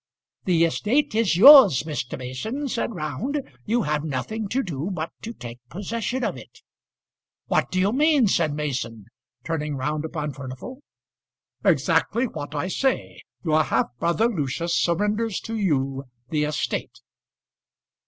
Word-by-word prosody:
"The 170 -3 +4
estate 245 - +1
is 215 -7 +2
yours, 245 - +9
Mr. 150 -5 -4
Mason," 215 - -4
said 240 -2 -2
Round. 175 - -2 0.3
"You 235 +1 +2
have 150 -2 -1
nothing 160 - -3
to 265 +7 0
do 160 -1 -4
but 165 -3 -4
to 225 - -6
take 120 - -9
possession 230 +6 -3
of - - -1
it." - - -14 0.8
"What - - +1
do 185 - -1
you 195 +3 +2
mean?" 295 -1 +4
said 165 -5 +2
Mason, 130 -8 -4 0.4
turning 150 -3 -2
round 150 +3 -2
upon 150 -2 -4
Furnival. 135 - -8 0.8
"Exactly 240 +3 +2
what 145 - -6
I 145 +5 -1
say. 265 +7 -1 0.2
Your 155 -1 +3
half 125 -5 0
brother 170 +7 +2
Lucius 170 - -2
surrenders 210 +5 0
to 225 - -5
you 135 -9 0 0.3
the 150 -1 +1
estate." 150 0 -3
170 Hz, 140 wpm, -24 LUFS, 150-225 Hz, 0.8 s, yours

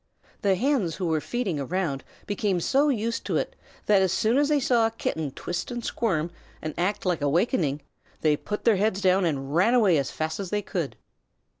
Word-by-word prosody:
The 195 -2 +3
Hens 220 - +1
who 185 - -3
were 160 -2 +1
feeding 210 -9 -2
around 145 -1 -2 0.2
became 200 -2 0
so 275 - +2
used 230 -3 -1
to - - +1
it - - -2 0.3
that 205 -2 +5
as 190 -2 +2
soon 225 +7 +2
as 290 0 +2
they 300 -1 +3
saw 240 -3 +3
a - - -2
Kitten 160 -9 -3
twist 175 +6 -4
and 240 -1 -5
squirm, 175 -8 -1 0.3
and 155 -1 -5
act 190 +4 -1
like 180 -4 0
awakening, 150 - +1 0.4
they 155 -2 +4
put 210 +7 -5
their 225 -4 +4
heads 205 0 +1
down 190 -1 +3
and 140 -3 -2
ran 190 +9 +4
away 195 -10 +4
as 135 - -2
fast 160 +2 -3
as 195 -3 -4
they 205 +1 -1
could. 170 -8 -3
190 Hz, 200 wpm, -26 LUFS, 160-225 Hz, 0.4 s, that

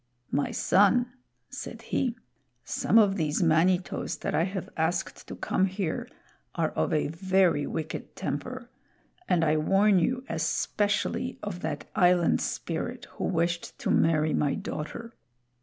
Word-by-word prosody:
"My 145 - +1
son," 240 +6 +3 0.4
said - - -7
he, 245 -3 -1 0.5
"some 195 - +1
of 205 -3 +5
these 155 +1 0
Manitos 175 +3 +2
that - - -2
I 165 - +2
have 190 -1 -4
asked 165 +2 -2
to - - -6
come 190 - +1
here 190 -3 -3 0.5
are - - 0
of 80 - -1
a 150 - +1
very 185 -2 +2
wicked 155 -1 -5
temper, 250 - -5 0.6
and 170 -2 +3
I 155 0 +3
warn 195 +5 +4
you 255 +8 0
especially 205 +9 -1
of 205 -4 -4
that 150 -4 -4
Island 180 -4 +4
Spirit 235 +9 -3
who - - -4
wished 170 -1 -1
to - - -1
marry 155 -1 +3
my 145 -2 +1
daughter. 230 +10 -6
180 Hz, 140 wpm, -28 LUFS, 160-205 Hz, 0.6 s, of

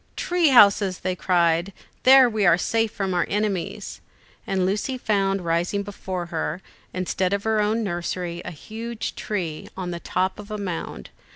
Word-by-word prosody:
"Tree 350 -2 +1
houses," 200 -7 +5
they 185 0 -1
cried; 175 0 +2 0.3
"there 265 0 +8
we 215 -3 -1
are 175 -3 +6
safe 225 +3 0
from 195 -4 -2
our 175 - +1
enemies." 205 -3 -2 0.5
And 190 -1 +1
Lucy 210 +7 -1
found 195 -5 0
rising 175 +4 0
before 190 -3 -5
her, 160 +1 -2 0.3
instead 185 +1 -1
of 200 0 -1
her 220 -1 +2
own 220 +2 +1
nursery, 175 -2 -3
a - - -5
huge 220 +6 -6
tree, 175 -7 -4
on 180 -2 -4
the 170 - -4
top 185 +3 -1
of 210 0 -10
a 215 - -4
mound. 185 -5 -5
195 Hz, 165 wpm, -24 LUFS, 180-215 Hz, 0.5 s, there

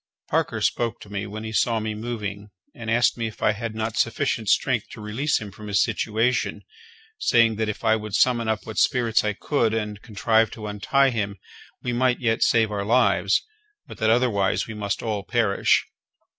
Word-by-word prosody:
Parker - - 0
spoke 120 -1 0
to 105 - -12
me 100 0 -3
when 110 +2 -7
he 110 - -5
saw 115 +1 +2
me 110 0 -3
moving, 105 -2 -5 0.2
and 115 -1 -7
asked 120 +1 +2
me 115 - -1
if 110 - -9
I - - +4
had 110 +1 -5
not 110 0 -3
sufficient 115 -3 0
strength 125 -1 +2
to - - -10
release 110 +8 -1
him 105 -2 -8
from 105 +2 -11
his 100 -1 +3
situation, 115 +2 0 0.6
saying 115 -2 +3
that 110 -1 -1
if 105 - -5
I 110 -1 +4
would 105 -2 -4
summon 120 -3 +3
up 110 -1 -1
what 110 -1 -3
spirits 120 -3 +2
I 105 -1 0
could, 115 0 0
and 105 -2 -3
contrive 110 0 +1
to 110 - -8
untie 135 +7 +2
him, 100 -3 -3 0.5
we 125 - -2
might 125 +1 +2
yet 115 -3 0
save 110 -2 +3
our 100 -1 -2
lives; 120 +5 +3 0.4
but - - -12
that 110 - +2
otherwise 110 -5 +2
we 110 - -7
must 100 -2 -3
all 110 -3 -2
perish. 110 -3 +2
110 Hz, 195 wpm, -24 LUFS, 105-120 Hz, 0.6 s, I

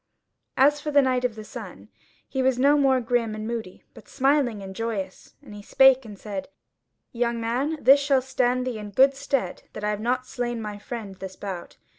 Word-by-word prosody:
As 290 +2 +4
for 300 - -4
the 285 -1 +5
Knight 255 -1 +1
of 240 -3 -1
the 215 - -8
Sun, 195 - -10 0.4
he 265 - -2
was 260 -1 +2
no 280 +3 +4
more 270 -3 +3
grim 230 -2 0
and 215 0 -5
moody, 225 -6 -5
but - - -15
smiling 270 -6 +1
and 190 0 -8
joyous, 210 -4 -5
and 230 -7 -12
he 205 - -9
spake 265 +4 +5
and 210 -2 -10
said: 195 -2 -6 0.6
"Young 235 -1 -1
man, 255 +7 -1
this 275 +1 +6
shall 275 -2 +2
stand 255 -1 0
thee 245 -4 -3
in 210 -1 -7
good 265 +7 +5
stead 275 -1 -2
that 215 - -7
I 210 - +1
have 210 0 -4
not 250 +2 0
slain 240 -2 -3
my 210 -2 -6
friend 225 -4 -7
this 190 0 -8
bout. 190 -4 -7
240 Hz, 205 wpm, -25 LUFS, 210-265 Hz, 0.6 s, this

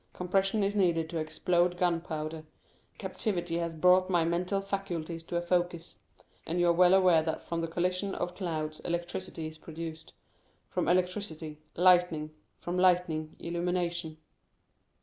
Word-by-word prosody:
Compression 195 +3 +1
is 200 +1 0
needed 170 -5 +2
to 165 - -2
explode 175 +3 +1
gunpowder. 165 -3 -1 0.5
Captivity 175 -6 -2
has 170 -1 -3
brought 180 +3 +4
my 175 -3 +3
mental 180 +4 0
faculties 175 -5 -4
to 175 - -5
a 170 - 0
focus; 175 -6 -1 0.5
and 170 +2 -1
you 175 - +4
are - - +5
well 180 +2 +6
aware 180 -4 +5
that 160 0 -3
from 170 -1 -3
the 165 - -1
collision 180 +4 -1
of 175 - -3
clouds 155 -4 -3
electricity 175 -1 -4
is 155 0 -8
produced—from 160 0 -7
electricity, 175 -4 -1 0.2
lightning, 175 -4 +4 0.3
from 175 +1 -2
lightning, 175 -4 +2
illumination." 170 -1 -2
175 Hz, 135 wpm, -30 LUFS, 160-180 Hz, 0.5 s, well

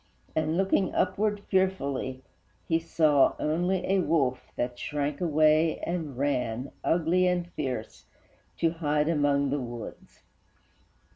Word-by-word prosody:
And, 155 +1 0
looking 195 0 +1
upward 205 +2 0
fearfully, 140 -10 -1 0.4
he 165 -1 +2
saw 155 -4 +3
Only 180 +4 0
a 195 0 +2
wolf 140 -8 0
that 120 0 -3
shrank 145 0 -3
away 155 -1 +3
and 160 -7 -3
ran, 125 -2 -1
Ugly 175 +2 +2
and 175 -1 -1
fierce, 125 -4 -5 0.5
to 165 -1 +2
hide 150 -2 0
among 145 -3 +2
the 145 - 0
woods. 120 -2 -9
155 Hz, 120 wpm, -28 LUFS, 140-175 Hz, 0.5 s, saw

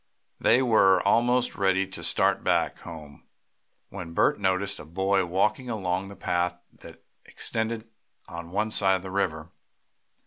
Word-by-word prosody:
They 130 - +4
were 100 -6 +4
almost 120 +3 +2
ready 95 0 +1
to 95 - -6
start - - +3
back - - 0
home 80 -4 -11 0.7
when 85 -4 -8
Bert - - +2
noticed 100 +1 0
a - - -8
boy 95 +4 0
walking 105 +7 0
along 95 -3 -2
the 100 - -10
path 90 -1 -1 0.2
that - - -15 0.2
extended 110 0 -3 0.4
on 85 0 -8
one 105 +4 -1
side 95 -2 +2
of 95 - -5
the 95 - -7
river. 80 -5 -2
95 Hz, 145 wpm, -26 LUFS, 90-105 Hz, 0.7 s, They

